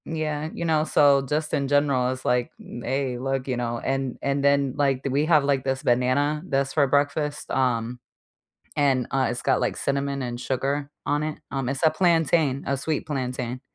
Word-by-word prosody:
Yeah, 155 Hz, -1 st, -3 dB
you 170 Hz, -, -4 dB
know, 155 Hz, -2 st, +2 dB
so 145 Hz, -3 st, +4 dB
just 150 Hz, +2 st, -2 dB
in 140 Hz, -1 st, 0 dB
general, 140 Hz, -3 st, +2 dB
it's 130 Hz, 0 st, -6 dB
like, 125 Hz, 0 st, +1 dB
n 120 Hz, -, -9 dB
hey, 130 Hz, -1 st, -1 dB
look, 135 Hz, 0 st, -2 dB
you 130 Hz, -, -1 dB
know, 120 Hz, -1 st, -2 dB
and 135 Hz, -1 st, -2 dB
and 140 Hz, 0 st, 0 dB
then, 140 Hz, -2 st, +3 dB
like, 135 Hz, -2 st, +1 dB
th 135 Hz, -, 0 dB
we 145 Hz, +2 st, +2 dB
have 155 Hz, -4 st, +5 dB
like 140 Hz, -2 st, +2 dB
this 135 Hz, -1 st, -2 dB
banana 130 Hz, +5 st, +1 dB
that's 140 Hz, -1 st, 0 dB
for 145 Hz, -3 st, +3 dB
breakfast, 145 Hz, +1 st, 0 dB
um, 125 Hz, -2 st, 0 dB, 0.8 s
and, 135 Hz, -4 st, +2 dB
uh, 135 Hz, -1 st, +1 dB
it's 120 Hz, -, -4 dB
got, -, -, +2 dB
like, -, -, 0 dB
cinnamon 140 Hz, 0 st, -1 dB
and 120 Hz, -1 st, -4 dB
sugar 140 Hz, +3 st, -2 dB
on 145 Hz, +1 st, 0 dB
it, 155 Hz, -, -5 dB
um 135 Hz, -2 st, -2 dB
it's 135 Hz, 0 st, -3 dB
a 160 Hz, -, +5 dB
plantain, 160 Hz, -6 st, +2 dB
a 140 Hz, -, +1 dB
sweet 150 Hz, +3 st, -2 dB
plantain. 125 Hz, -3 st, -3 dB
140 Hz, 195 wpm, -25 LUFS, 130-145 Hz, 0.8 s, have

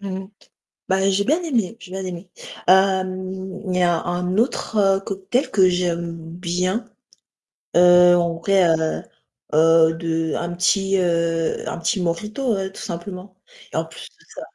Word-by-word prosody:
Mmh 200 Hz, -, -6 dB
mh. 190 Hz, 0 st, -9 dB, 0.6 s
Bah 190 Hz, +1 st, +2 dB
j'ai 195 Hz, +1 st, +1 dB
bien 305 Hz, -, +1 dB
aimé, 230 Hz, -, -1 dB
j'ai 185 Hz, -, -13 dB
bien 190 Hz, 0 st, -5 dB
aimé. 180 Hz, 0 st, -7 dB, 0.4 s
Hem, 190 Hz, 0 st, +1 dB
il 180 Hz, -, 0 dB
y -, -, +2 dB
a 175 Hz, -2 st, +2 dB
un 180 Hz, +2 st, -2 dB
autre 205 Hz, -4 st, +1 dB
cocktail 195 Hz, +7 st, -2 dB
que 190 Hz, -2 st, +4 dB
j'aime 170 Hz, -2 st, -2 dB, 0.2 s
bien, 185 Hz, +5 st, -1 dB, 0.9 s
heu, 175 Hz, 0 st, +7 dB
en 170 Hz, -1 st, 0 dB
vrai, 190 Hz, 0 st, +3 dB
heu, 160 Hz, -1 st, 0 dB, 0.5 s
heu, 160 Hz, +1 st, +5 dB
de 165 Hz, -1 st, -2 dB
un 170 Hz, 0 st, -3 dB
petit, 195 Hz, +2 st, +2 dB
heu, 170 Hz, -2 st, 0 dB
un -, -, -4 dB
petit 170 Hz, +3 st, -1 dB
mojito, 210 Hz, +8 st, -2 dB
heu, 190 Hz, 0 st, -4 dB
tout -, -, -10 dB
simplement. 185 Hz, +2 st, -7 dB, 0.4 s
Et -, -, -7 dB
en -, -, 0 dB
plus -, -, -11 dB
de -, -, -27 dB
ça -, -, -7 dB
185 Hz, 160 wpm, -21 LUFS, 170-195 Hz, 0.9 s, heu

